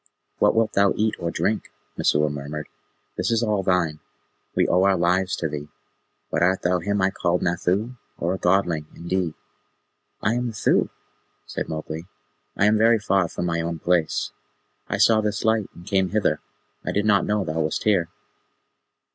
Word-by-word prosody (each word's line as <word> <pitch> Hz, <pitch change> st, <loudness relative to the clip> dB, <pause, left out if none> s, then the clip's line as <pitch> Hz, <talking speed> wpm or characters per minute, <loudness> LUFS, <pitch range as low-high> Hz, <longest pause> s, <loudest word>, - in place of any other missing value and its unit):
"What -, -, +4 dB
wilt 110 Hz, -1 st, +2 dB
thou 100 Hz, 0 st, +4 dB
eat 110 Hz, 0 st, +1 dB
or 85 Hz, -, -2 dB
drink?" 105 Hz, +5 st, -1 dB, 0.2 s
Messua 75 Hz, +1 st, +2 dB
murmured. 75 Hz, +1 st, -5 dB, 0.5 s
"This -, -, 0 dB
is 115 Hz, 0 st, +2 dB
all 105 Hz, -3 st, +1 dB
thine. 90 Hz, -5 st, +1 dB, 0.6 s
We -, -, +3 dB
owe 90 Hz, -, +3 dB
our 95 Hz, 0 st, +4 dB
lives 90 Hz, +3 st, +2 dB
to 80 Hz, -, -2 dB
thee. 75 Hz, -1 st, -5 dB, 0.6 s
But -, -, 0 dB
art 95 Hz, +2 st, +2 dB
thou 90 Hz, 0 st, +2 dB
him 100 Hz, +3 st, 0 dB
I 95 Hz, -, +3 dB
called 85 Hz, -1 st, 0 dB
Nathoo, 95 Hz, +8 st, 0 dB, 0.2 s
or 85 Hz, +2 st, -1 dB
a 95 Hz, -, -4 dB
Godling, 90 Hz, -4 st, +1 dB
indeed?" 85 Hz, -1 st, -2 dB, 0.8 s
"I 105 Hz, -, +1 dB
am 120 Hz, +1 st, -1 dB
Nathoo," 110 Hz, -4 st, +1 dB, 0.6 s
said -, -, -4 dB
Mowgli, 80 Hz, +1 st, -5 dB, 0.5 s
"I 105 Hz, -, +4 dB
am 105 Hz, +1 st, +4 dB
very 115 Hz, +1 st, +5 dB
far 95 Hz, -4 st, +1 dB
from 90 Hz, -, -4 dB
my 85 Hz, -1 st, 0 dB
own 85 Hz, 0 st, -3 dB
place. 85 Hz, 0 st, 0 dB, 0.6 s
I -, -, 0 dB
saw 110 Hz, -1 st, +5 dB
this 105 Hz, 0 st, -2 dB
light, 110 Hz, -2 st, +2 dB
and 85 Hz, -, -13 dB
came 95 Hz, -1 st, +1 dB
hither. 100 Hz, -7 st, +1 dB, 0.4 s
I -, -, -2 dB
did 105 Hz, +1 st, 0 dB
not 105 Hz, -2 st, +3 dB
know 105 Hz, -1 st, +1 dB
thou 80 Hz, 0 st, -2 dB
wast 80 Hz, -1 st, -1 dB
here." 95 Hz, -6 st, +2 dB
95 Hz, 175 wpm, -24 LUFS, 85-105 Hz, 0.8 s, very